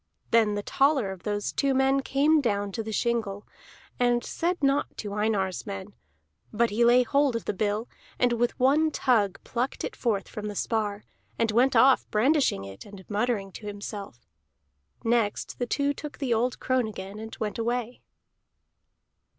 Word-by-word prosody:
Then 220 -3 +4
the 205 - -3
taller 270 -7 +2
of 190 -2 -9
those 205 -1 -2
two 275 -2 +1
men 270 +1 +3
came 295 +3 +3
down 205 -5 -1
to 225 - -3
the 220 0 -5
shingle, 215 -3 -1 0.5
and 240 -1 +2
said 345 -1 -2
naught 275 +1 +3
to 205 -2 -5
Einar's 205 -2 -1
men; 200 0 -6 0.6
but 230 +1 +1
he 225 +3 +2
laid 245 +1 +5
hold 280 0 +2
of 230 - -3
the - - -1
bill 210 +3 -1 0.3
and 245 -1 +2
with 240 +1 0
one 290 +5 +4
tug 225 -10 +1
plucked 250 +2 -3
it 470 - -4
forth 215 -5 -1
from 210 0 -6
the 205 - -5
spar, 210 -1 -1 0.3
and 230 -1 +1
went 245 +5 +3
off 265 0 +5
brandishing 250 - +2
it 95 0 -10
and 200 -2 -13
muttering 205 -2 0
to 210 - -9
himself. 200 - -7 0.8
Next 225 -3 0
the 245 - -1
two 285 +3 +1
took 295 +1 -8
the 265 -4 0
old 245 +2 0
crone 255 -3 +1
again, 200 -1 -7
and 220 0 -8
went 215 0 -3
away. 240 +1 -2
230 Hz, 170 wpm, -27 LUFS, 205-255 Hz, 0.8 s, laid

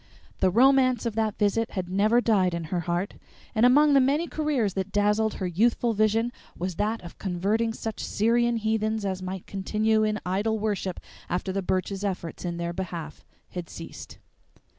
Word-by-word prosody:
The 190 - +4
romance 255 +2 +4
of 230 - -1
that 220 -1 -1
visit 215 +2 +1
had 185 -3 -3
never 210 +6 +3
died 190 -7 +2
in 170 - -3
her 180 - +1
heart, 175 +4 -2 0.4
and 230 +2 +5
among 290 +3 +5
the 275 - +7
many 280 +5 +2
careers 290 - 0
that 190 +1 -3
dazzled 210 +1 +2
her 190 - -3
youthful 230 +6 +2
vision 220 +2 +2 0.3
was 180 -1 -3
that 215 +1 -1
of 170 - -11
converting 205 +5 0
such 225 -1 -5
Syrian 235 +2 +2
heathen 220 -1 0
as 190 -1 -2
might 185 0 -5
continue 215 +2 +1
in 215 0 0
idol 205 +5 0
worship 205 -4 -2 0.3
after 180 +2 -1
the 195 +1 -1
Burches' 190 +2 -2
efforts 180 -5 -4
in 175 -1 -3
their 170 0 -3
behalf 170 -4 -6 0.3
had 175 -3 -6
ceased. - - -9
210 Hz, 175 wpm, -26 LUFS, 185-225 Hz, 0.4 s, the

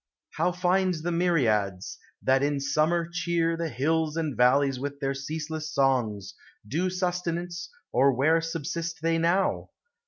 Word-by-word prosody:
How 180 - +2
find 180 +1 +1
the 165 +2 -3
myriads, 115 - 0 0.2
that 135 0 +3
in 145 0 0
summer 155 +5 +1
cheer 170 -2 0
The 165 0 -3
hills 155 +5 0
and 155 -5 -2
valleys 130 +2 +3
with 140 +1 -5
their 135 -1 -1
ceaseless 155 +2 -5
songs, 120 -8 0 0.3
Due 165 - 0
sustenance, 175 -1 -3 0.2
or 135 +3 +5
where 155 +6 +3
subsist 165 0 -4
they 165 0 +2
now? 175 +4 +1
160 Hz, 135 wpm, -27 LUFS, 135-170 Hz, 0.3 s, or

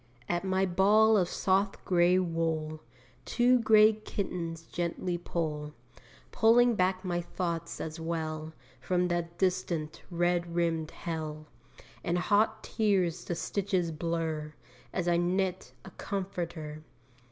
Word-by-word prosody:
At 175 +1 -1
my 190 0 +1
ball 205 +5 +5
of 180 -4 +2
soft 195 +1 0
grey 180 0 +4
wool 165 -3 -1 0.4
Two 245 - +3
grey 215 -1 +6
kittens 180 -6 -4
gently 175 +1 -3
pull 155 -3 -3 0.6
Pulling 240 +2 +5
back 185 -2 0
my 175 -1 -1
thoughts 170 -1 -4
as 160 +1 -5
well, 160 -1 -3 0.3
From 180 -1 0
that 170 0 -2
distant, 180 -4 -1
red 175 -1 0
rimmed 165 -2 0
hell, 155 -2 -5 0.6
And 175 -1 0
hot 215 +4 +2
tears 185 -5 +1
the 175 - -2
stitches 185 -1 -1
blur 160 -2 -3 0.4
As 180 -2 -2
I 170 -1 +3
knit 185 +1 0
a 190 - -10
comforter. 170 -7 -5
175 Hz, 120 wpm, -30 LUFS, 165-190 Hz, 0.6 s, grey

